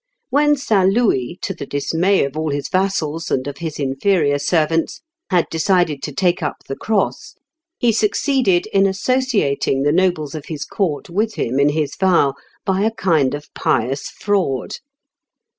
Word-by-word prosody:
When 295 Hz, +2 st, +4 dB
St. 205 Hz, -9 st, +2 dB
Louis, 185 Hz, -, +1 dB
to 195 Hz, -, -2 dB
the 140 Hz, -6 st, -8 dB
dismay 165 Hz, +6 st, +1 dB
of 140 Hz, +1 st, -6 dB
all 155 Hz, 0 st, -1 dB
his 145 Hz, -1 st, -3 dB
vassals, 170 Hz, -5 st, -1 dB
and 130 Hz, -, 0 dB
of 140 Hz, 0 st, -6 dB
his 160 Hz, -3 st, -4 dB
inferior 145 Hz, +2 st, +1 dB
servants, 165 Hz, -, 0 dB, 0.3 s
had 180 Hz, -3 st, +3 dB
decided 165 Hz, -4 st, +1 dB
to -, -, -4 dB
take 180 Hz, -3 st, +1 dB
up 150 Hz, -, -2 dB
the 135 Hz, -, -4 dB
cross, 215 Hz, +3 st, -2 dB, 0.4 s
he 240 Hz, -, +3 dB
succeeded 215 Hz, -2 st, +1 dB
in 195 Hz, 0 st, +4 dB
associating 195 Hz, -, 0 dB
the 145 Hz, -, +3 dB
nobles 175 Hz, -5 st, +1 dB
of 155 Hz, -2 st, -6 dB
his 150 Hz, -3 st, -5 dB
court 170 Hz, -5 st, -2 dB
with 215 Hz, +4 st, -1 dB
him 130 Hz, +4 st, -1 dB
in 140 Hz, +1 st, +4 dB
his 145 Hz, -1 st, -1 dB
vow 175 Hz, -7 st, +3 dB, 0.3 s
by 190 Hz, 0 st, +1 dB
a 215 Hz, -, +3 dB
kind 160 Hz, -11 st, +1 dB
of 145 Hz, 0 st, -11 dB
pious 135 Hz, +5 st, -1 dB
fraud. 190 Hz, -11 st, -1 dB
170 Hz, 160 wpm, -19 LUFS, 145-195 Hz, 0.4 s, When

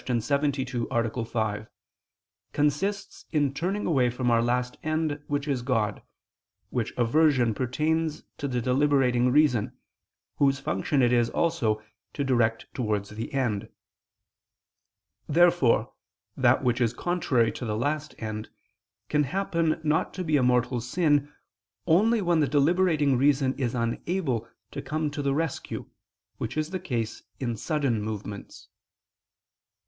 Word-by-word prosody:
72, 130 Hz, 0 st, -1 dB
A. 115 Hz, 0 st, -1 dB
5), 110 Hz, -2 st, -2 dB, 0.9 s
consists 150 Hz, +8 st, -1 dB
in 145 Hz, -4 st, +1 dB
turning 190 Hz, +7 st, -2 dB
away 130 Hz, -7 st, +3 dB
from 125 Hz, 0 st, -1 dB
our 115 Hz, 0 st, +4 dB
last 125 Hz, +1 st, 0 dB
end 155 Hz, -2 st, -1 dB
which 145 Hz, 0 st, -2 dB
is 135 Hz, -4 st, 0 dB
God, 115 Hz, -4 st, -1 dB, 0.7 s
which 115 Hz, -3 st, -1 dB
aversion 125 Hz, -1 st, +3 dB
pertains 155 Hz, +6 st, -1 dB, 0.2 s
to 140 Hz, -, -2 dB
the 125 Hz, -2 st, -1 dB
deliberating 125 Hz, -1 st, +2 dB
reason, 125 Hz, -5 st, +3 dB, 0.6 s
whose 140 Hz, -1 st, +3 dB
function 130 Hz, +8 st, 0 dB
it 120 Hz, 0 st, +3 dB
is 120 Hz, -1 st, +3 dB
also 115 Hz, -11 st, 0 dB, 0.3 s
to 140 Hz, -, -2 dB
direct 115 Hz, -4 st, +1 dB
towards 105 Hz, -5 st, -2 dB
the 110 Hz, +2 st, -6 dB
end. 120 Hz, -7 st, -1 dB, 1.6 s
Therefore 170 Hz, -5 st, +3 dB, 0.4 s
that 130 Hz, 0 st, +3 dB
which 125 Hz, 0 st, +1 dB
is 115 Hz, -1 st, +2 dB
contrary 140 Hz, -10 st, +1 dB
to -, -, -8 dB
the 110 Hz, -2 st, -2 dB
last 150 Hz, +5 st, -2 dB
end 110 Hz, -1 st, -5 dB, 0.6 s
can 150 Hz, -1 st, +2 dB
happen 165 Hz, -2 st, 0 dB
not 155 Hz, +1 st, 0 dB
to 185 Hz, -, -3 dB
be 155 Hz, -3 st, +1 dB
a 140 Hz, -, +4 dB
mortal 125 Hz, 0 st, +2 dB
sin, 145 Hz, +2 st, +1 dB, 0.5 s
only 210 Hz, +6 st, +3 dB
when 175 Hz, -2 st, +2 dB
the 150 Hz, -, +3 dB
deliberating 150 Hz, -2 st, +3 dB
reason 135 Hz, -1 st, +3 dB
is 130 Hz, -4 st, -2 dB
unable 120 Hz, -, -2 dB, 0.2 s
to -, -, -5 dB
come 155 Hz, -1 st, -2 dB
to 145 Hz, -, -4 dB
the 140 Hz, -1 st, 0 dB
rescue, 160 Hz, -2 st, -3 dB, 0.5 s
which 115 Hz, +4 st, -4 dB
is 155 Hz, +2 st, -1 dB
the 185 Hz, -, -2 dB
case 120 Hz, -10 st, -3 dB, 0.2 s
in 120 Hz, -3 st, -2 dB
sudden 135 Hz, -3 st, -1 dB
movements. 105 Hz, -1 st, -7 dB
135 Hz, 135 wpm, -27 LUFS, 120-155 Hz, 1.6 s, our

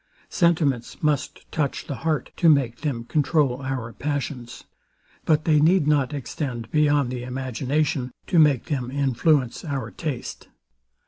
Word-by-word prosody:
Sentiments 160 Hz, -, +1 dB
must 150 Hz, -2 st, -1 dB
touch 145 Hz, -4 st, -2 dB
the 140 Hz, -, -5 dB
heart, 155 Hz, -5 st, -1 dB
to 170 Hz, -, +4 dB
make 135 Hz, -6 st, +3 dB
them 135 Hz, -7 st, -3 dB
controul 145 Hz, -1 st, +1 dB
our 130 Hz, -4 st, -4 dB
passions: 135 Hz, -3 st, -4 dB, 0.6 s
But 155 Hz, -1 st, +2 dB
they 155 Hz, -2 st, +4 dB
need 165 Hz, +2 st, +4 dB
not 145 Hz, -3 st, +2 dB
extend 125 Hz, -4 st, -5 dB
beyond 145 Hz, -4 st, +2 dB
the 125 Hz, -1 st, -4 dB
imagination, 130 Hz, +2 st, -2 dB
to 175 Hz, -, +2 dB
make 145 Hz, -6 st, +4 dB
them 130 Hz, -6 st, -2 dB
influence 135 Hz, 0 st, +1 dB
our 140 Hz, -5 st, -4 dB
taste. 145 Hz, -7 st, -5 dB
140 Hz, 135 wpm, -24 LUFS, 125-150 Hz, 0.6 s, to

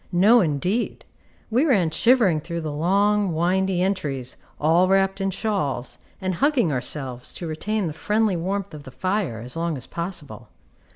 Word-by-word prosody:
No, 205 Hz, +7 st, +6 dB
indeed! 180 Hz, -, -1 dB, 0.5 s
We 245 Hz, +5 st, +3 dB
ran 200 Hz, -, +3 dB
shivering 200 Hz, -3 st, +3 dB
through 170 Hz, +1 st, -4 dB
the 155 Hz, -1 st, -4 dB
long, 200 Hz, +5 st, +2 dB
windy 180 Hz, +2 st, +1 dB
entries, 140 Hz, -10 st, -2 dB, 0.2 s
all 165 Hz, +4 st, +4 dB
wrapped 195 Hz, 0 st, +2 dB
in 195 Hz, -, +1 dB
shawls, 185 Hz, -, -2 dB, 0.2 s
and 185 Hz, 0 st, -2 dB
hugging 255 Hz, -, +2 dB
ourselves 130 Hz, -1 st, -4 dB
to 175 Hz, -, -5 dB
retain 200 Hz, +6 st, -2 dB
the 160 Hz, -, -3 dB
friendly 210 Hz, +6 st, +1 dB
warmth 195 Hz, +2 st, -3 dB
of 150 Hz, -, -8 dB
the 140 Hz, -, -11 dB
fire 185 Hz, -, -2 dB
as 125 Hz, +4 st, -9 dB
long 165 Hz, -2 st, -1 dB
as 130 Hz, -, -5 dB
possible. 170 Hz, -4 st, -6 dB
180 Hz, 160 wpm, -23 LUFS, 155-200 Hz, 0.5 s, No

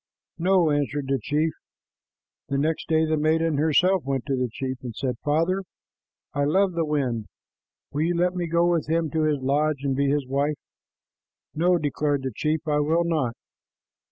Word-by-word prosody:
"No," 180 Hz, -2 st, +3 dB
answered 145 Hz, -1 st, -1 dB
the 135 Hz, -1 st, +1 dB
chief. 155 Hz, +2 st, 0 dB, 1.0 s
The 140 Hz, -, 0 dB
next 155 Hz, +3 st, -1 dB
day 160 Hz, 0 st, +3 dB
the 155 Hz, 0 st, 0 dB
maiden 160 Hz, 0 st, +1 dB
herself 180 Hz, +4 st, +3 dB
went 135 Hz, -2 st, -2 dB
to 140 Hz, -2 st, 0 dB
the 125 Hz, -1 st, -1 dB
chief 130 Hz, +1 st, -4 dB
and 120 Hz, -4 st, -7 dB
said, 130 Hz, -3 st, -2 dB
"Father, 165 Hz, +6 st, +1 dB, 0.7 s
I 145 Hz, -, 0 dB
love 190 Hz, +7 st, +3 dB
the 170 Hz, -2 st, -1 dB
wind. 125 Hz, -7 st, -1 dB, 0.6 s
Will 145 Hz, -, -2 dB
you 170 Hz, +2 st, +1 dB
let 180 Hz, +1 st, +2 dB
me 175 Hz, -2 st, -2 dB
go 170 Hz, +1 st, +2 dB
with 170 Hz, -4 st, +1 dB
him 165 Hz, -2 st, +1 dB
to 160 Hz, -, 0 dB
his 150 Hz, -1 st, +2 dB
lodge 145 Hz, +1 st, +1 dB
and 135 Hz, -1 st, 0 dB
be 140 Hz, +1 st, +1 dB
his 145 Hz, -1 st, +1 dB
wife?" 140 Hz, +3 st, 0 dB, 1.0 s
"No," 175 Hz, +3 st, +3 dB
declared 145 Hz, -2 st, -1 dB
the 130 Hz, -3 st, -3 dB
chief, 155 Hz, +3 st, -1 dB
"I 150 Hz, -1 st, +2 dB
will 160 Hz, +3 st, +2 dB
not. 150 Hz, -9 st, 0 dB
150 Hz, 180 wpm, -25 LUFS, 140-165 Hz, 1.0 s, No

